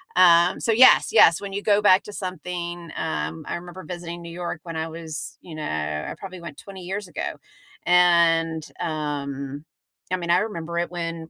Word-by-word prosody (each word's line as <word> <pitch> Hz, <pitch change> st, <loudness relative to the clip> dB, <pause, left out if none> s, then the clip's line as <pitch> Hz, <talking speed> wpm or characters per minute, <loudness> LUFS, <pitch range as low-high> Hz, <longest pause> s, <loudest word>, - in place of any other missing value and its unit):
Um, 175 Hz, -1 st, +6 dB
so 230 Hz, -, +1 dB
yes, 260 Hz, +3 st, +7 dB
yes, 170 Hz, -6 st, +6 dB
when 200 Hz, -1 st, -6 dB
you 200 Hz, -, -2 dB
go 205 Hz, -1 st, +3 dB
back 195 Hz, -2 st, +5 dB
to 210 Hz, -, -10 dB
something, 175 Hz, -3 st, -5 dB
um 160 Hz, 0 st, -3 dB
I -, -, -3 dB
remember 175 Hz, +2 st, -8 dB
visiting 175 Hz, -1 st, -7 dB
New 170 Hz, -, -9 dB
York 175 Hz, -1 st, -5 dB
when 165 Hz, -2 st, -7 dB
I 160 Hz, 0 st, -2 dB
was, 160 Hz, -1 st, -6 dB
you 170 Hz, -3 st, -10 dB
know, 155 Hz, -, -5 dB
I 75 Hz, 0 st, -3 dB
probably 185 Hz, -2 st, -8 dB
went 170 Hz, -4 st, -8 dB
20 195 Hz, -2 st, -10 dB
years 190 Hz, +2 st, -5 dB
ago, 175 Hz, -, -4 dB, 0.5 s
and, 170 Hz, -2 st, +4 dB, 0.2 s
um, 145 Hz, -2 st, -4 dB, 0.5 s
I 185 Hz, -, +1 dB
mean, 170 Hz, -1 st, -5 dB
I 175 Hz, -, +5 dB
remember 170 Hz, -5 st, -4 dB
it 175 Hz, 0 st, -2 dB
when 165 Hz, -2 st, -5 dB
170 Hz, 185 wpm, -24 LUFS, 160-180 Hz, 0.5 s, yes